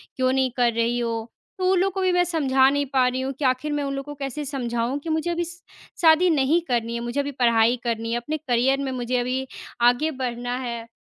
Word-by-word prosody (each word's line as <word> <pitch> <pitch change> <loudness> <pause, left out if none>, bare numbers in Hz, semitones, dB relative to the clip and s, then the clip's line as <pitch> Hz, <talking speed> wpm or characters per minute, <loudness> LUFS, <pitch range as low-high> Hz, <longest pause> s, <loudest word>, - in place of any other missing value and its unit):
क्यों 255 0 +1
नहीं 265 -1 +1
कर 240 -2 +3
रही 235 +1 0
हो? 230 -1 -3 0.3
तो 370 - 0
वो 380 - +4
लोगों 380 +2 +2
को 385 - -3
भी 370 -1 +2
मैं 355 0 +4
समझा 270 -6 +3
नहीं 285 0 0
पा 255 -2 +4
रही 255 +1 -1
हूँ 265 +1 -2
कि 280 - -1
आखिर 255 +4 +1
मैं 290 - -1
उन 275 0 -3
लोगों 285 +2 -6
को - - -16
कैसे 275 +3 -4
समझाऊँ 245 -1 -2
कि 330 - -5
मुझे 315 +2 0
अभी 345 0 -1
श 345 +1 -10 0.4
शादी 330 +2 +6
नहीं 300 +1 +3
करनी 235 -2 -1
है। - - -2
मुझे 240 +3 -3
अभी 285 0 -1
पढ़ाई 235 -1 +3
करनी 230 -1 -2
है 235 - +1
अपने 300 +6 -3
करियर 265 -1 +1
में 265 - -2
मुझे 250 0 -2
अभी 255 +2 -1 0.3
आगे 245 +6 +3
बढ़ना 245 -2 -3
है। 235 -3 -5
260 Hz, 245 wpm, -24 LUFS, 240-295 Hz, 0.4 s, शादी